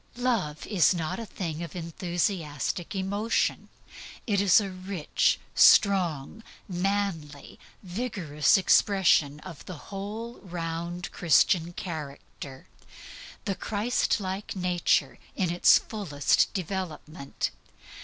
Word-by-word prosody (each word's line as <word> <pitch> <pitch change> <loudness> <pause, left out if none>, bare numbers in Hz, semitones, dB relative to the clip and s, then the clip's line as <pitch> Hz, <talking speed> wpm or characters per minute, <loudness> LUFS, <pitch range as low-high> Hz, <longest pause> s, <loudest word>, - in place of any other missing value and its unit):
Love 225 -12 -1
is 190 -3 +3
not 160 +4 -3
a 230 - -6
thing 165 -5 -5
of 170 -1 -7
enthusiastic 170 0 -3
emotion. 200 +4 -1 0.6
It 200 -4 +1
is 200 0 +6
a 200 -2 -3
rich, 185 -3 0
strong, 185 -3 +4 0.3
manly, 180 -6 -3 0.2
vigorous 180 - +1
expression 185 -7 +3
of 170 -5 -10
the 180 - -7 0.2
whole 215 +4 -6
round 170 -1 -5
Christian 170 +1 +3
character 145 -6 -8 0.8
the 200 - 0
Christlike 205 -2 -1
nature 175 -6 +1 0.2
in 180 -3 0
its 175 - +6
fullest 170 - 0
development. 170 -6 -4
180 Hz, 95 wpm, -27 LUFS, 160-200 Hz, 0.8 s, is